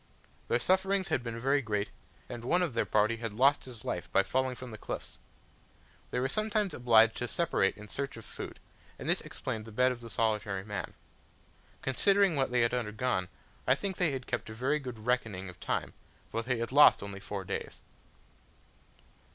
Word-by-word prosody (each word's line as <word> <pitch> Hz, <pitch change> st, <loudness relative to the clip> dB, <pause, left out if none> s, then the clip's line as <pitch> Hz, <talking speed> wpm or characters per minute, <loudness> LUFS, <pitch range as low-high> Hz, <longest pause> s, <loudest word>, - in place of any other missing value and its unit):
Their 120 Hz, -, +3 dB
sufferings 190 Hz, +6 st, +2 dB
had -, -, +1 dB
been 115 Hz, -1 st, -4 dB
very 135 Hz, +4 st, +2 dB
great, 105 Hz, -4 st, -2 dB, 0.4 s
and 120 Hz, -1 st, -7 dB
one 175 Hz, +9 st, +3 dB
of 165 Hz, -8 st, -1 dB
their 115 Hz, -, 0 dB
party 110 Hz, +2 st, +3 dB
had 115 Hz, -2 st, -4 dB
lost 135 Hz, +6 st, +4 dB
his 120 Hz, -4 st, -10 dB
life 90 Hz, -, -3 dB
by 100 Hz, -, +5 dB
falling 130 Hz, +5 st, 0 dB
from 125 Hz, -1 st, -8 dB
the 110 Hz, -, -7 dB
cliffs. -, -, -6 dB, 0.9 s
They -, -, -1 dB
were 130 Hz, -, +1 dB
sometimes 215 Hz, +4 st, 0 dB
obliged 115 Hz, -2 st, +5 dB
to 120 Hz, -, -2 dB
separate 140 Hz, -, +1 dB
in 105 Hz, 0 st, -10 dB
search 140 Hz, +2 st, -4 dB
of 115 Hz, -, -10 dB
food, -, -, -7 dB, 0.4 s
and -, -, -7 dB
this -, -, +3 dB
explained 110 Hz, -1 st, -4 dB
the 110 Hz, -, -10 dB
bed 125 Hz, +4 st, +3 dB
of 120 Hz, -1 st, -6 dB
the 115 Hz, -, -9 dB
solitary 105 Hz, -4 st, 0 dB
man. 105 Hz, 0 st, -5 dB, 0.9 s
Considering 195 Hz, +7 st, +3 dB
what 135 Hz, -2 st, +1 dB
they 125 Hz, 0 st, +2 dB
had 115 Hz, -, +2 dB
undergone, 110 Hz, -4 st, -1 dB, 0.4 s
I 130 Hz, -, +6 dB
think 190 Hz, +5 st, -4 dB
they 175 Hz, -, +3 dB
had 135 Hz, -3 st, -4 dB
kept -, -, -3 dB
a 110 Hz, -, -7 dB
very 135 Hz, +6 st, +1 dB
good 120 Hz, -6 st, -8 dB
reckoning 110 Hz, -7 st, 0 dB
of 90 Hz, -4 st, -12 dB
time, -, -, -2 dB, 0.4 s
for 115 Hz, -, -1 dB
they 125 Hz, +1 st, -1 dB
had 115 Hz, +1 st, -3 dB
lost 145 Hz, -6 st, +7 dB
only 100 Hz, -1 st, -6 dB
four 100 Hz, 0 st, -5 dB
days. -, -, -4 dB
120 Hz, 190 wpm, -31 LUFS, 110-135 Hz, 0.9 s, lost